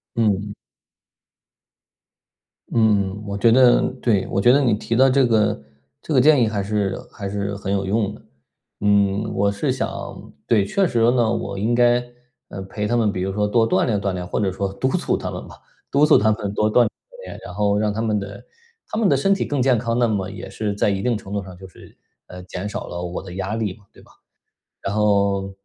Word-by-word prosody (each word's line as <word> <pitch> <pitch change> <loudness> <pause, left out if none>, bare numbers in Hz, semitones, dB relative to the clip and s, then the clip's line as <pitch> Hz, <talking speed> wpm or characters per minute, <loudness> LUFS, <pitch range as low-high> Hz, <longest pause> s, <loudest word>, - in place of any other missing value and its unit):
嗯。 105 -2 0 2.2
嗯， 105 -3 +1
我 100 0 -3
觉 115 +3 +4
得 125 0 +5 0.2
对， 105 -6 +1
我 100 - +1
觉 120 - +6
得 140 - +5
你 120 -5 +2
提 115 +2 -2
的 130 +2 +5
这 135 0 +4
个， 105 -8 +1 0.4
这 - - -9
个 135 - +5
建 145 +1 +5
议 115 - +3
还 105 -2 -2
是 100 -1 -1
还 100 -3 -6
是 100 0 -3
很 100 0 -4
有 100 -1 0
用 105 +1 0
的。 - - -17 0.6
嗯， 100 0 +2
我 100 +1 +2
是 100 - -1
想 - - -5 0.2
对， 105 -4 +3
确 190 - +1
实 120 - -1
呢， 120 -3 +2
我 100 -4 -3
应 115 +4 +1
该， 120 0 +3 0.5
呃 95 - -7
陪 105 +2 -4
他 120 +2 +1
们 110 -3 +2
比 90 - -4
如 95 - -1
说， 105 0 0
多 115 +1 +2
锻 - - +2
炼 105 -5 0
锻 100 -1 -1
炼， 90 -1 -4
或 - - -2
者 100 -2 0
说 95 +1 -3
督 130 +6 -1
促 - - 0
他 - - -4
们 - - -7
吧。 - - -12 0.4
督 145 +2 +4
促 - - +6
他 110 +2 +3
们 105 -2 -3
多 105 0 +1
锻 - - +4
炼 120 - +3
锻 - - -16
炼。 - - -9
然 90 - -8
后 100 +1 +1
让 105 0 0
他 110 - -3
们 110 -2 0
的 100 - -8 0.4
他 - - -5
们 225 - +2
的 140 - +4
身 195 +9 +2
体 - - -2
更 145 -3 -1
健 130 -1 +3
康， 115 +1 -1
那 120 - +3
么 100 -4 -2
也 95 -1 -8
是 105 +1 -3
在 105 - +1
一 100 -1 -1
定 125 -1 +1
程 100 -2 -8
度 100 - -2
上 95 -1 -11
就 95 +1 -11
是， 90 - -17 0.3
呃， 90 0 -10
减 90 +2 -6
少 105 - -5
了 85 - -6
我 90 0 -5
的 90 -2 -10
压 95 +2 -3
力 105 -5 -3
嘛， 105 - -23
对 - - -17
吧？ - - -21 0.7
然 100 - -3
后， 100 -2 +1
105 Hz, 245 characters per minute, -21 LUFS, 100-115 Hz, 2.2 s, 觉